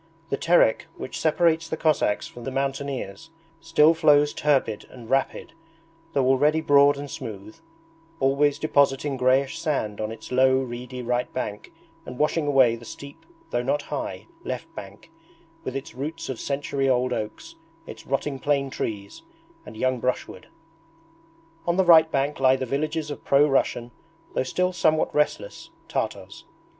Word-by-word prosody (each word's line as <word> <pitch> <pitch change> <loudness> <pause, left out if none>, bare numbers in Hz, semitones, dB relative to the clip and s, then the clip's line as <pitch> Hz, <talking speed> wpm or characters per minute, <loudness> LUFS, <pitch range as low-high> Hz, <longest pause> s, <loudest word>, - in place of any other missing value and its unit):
The - - +2
Terek, 170 -4 +3
which - - -6
separates 165 0 +2
the 160 - -3
Cossacks 155 -10 +1
from 120 - -11
the 135 - -3
mountaineers, 135 -3 -3 0.3
still 165 -1 +4
flows 150 -2 +4
turbid 135 -8 0
and 120 -3 -12
rapid 135 +5 -1 0.6
though 135 -2 +2
already 145 +4 +3
broad 145 -2 +5
and 145 0 -6
smooth, 110 -5 -8 0.6
always 140 +2 +2
depositing 140 -2 +1
greyish 130 +1 +2
sand 110 -10 -2
on 110 0 -3
its 115 - -10
low 130 +1 +4
reedy 125 0 -5
right 120 +1 -1
bank 105 -5 -5 0.3
and 125 -4 -9
washing 150 +1 +1
away 130 -5 +4
the 115 - -12
steep, 140 +4 -11 0.2
though 120 - 0
not 140 +3 -1
high, - - -5 0.2
left - - -5
bank, 100 +11 -11 0.5
with 130 - -5
its 135 -3 -6
roots 140 +6 -5
of 130 - -4
century 140 -1 -1
old 125 0 +1
oaks, 105 -2 -5 0.3
its - - -11
rotting 135 +1 -2
plane 140 -1 0
trees, 100 -5 -5 0.5
and 110 - -10
young 130 +1 0
brushwood. 125 +2 -3 1.2
On 170 +1 +1
the 190 - +3
right 160 -2 +7
bank 140 +1 -1
lie 130 -1 +5
the 130 0 -3
villages 155 +3 -2
of 145 - -7
pro 140 +2 +4
Russian, 120 -3 0 0.4
though - - +1
still 180 +8 0
somewhat 155 -3 +1
restless, 150 - -1 0.2
Tartars. - - -4
135 Hz, 150 wpm, -25 LUFS, 125-150 Hz, 1.2 s, right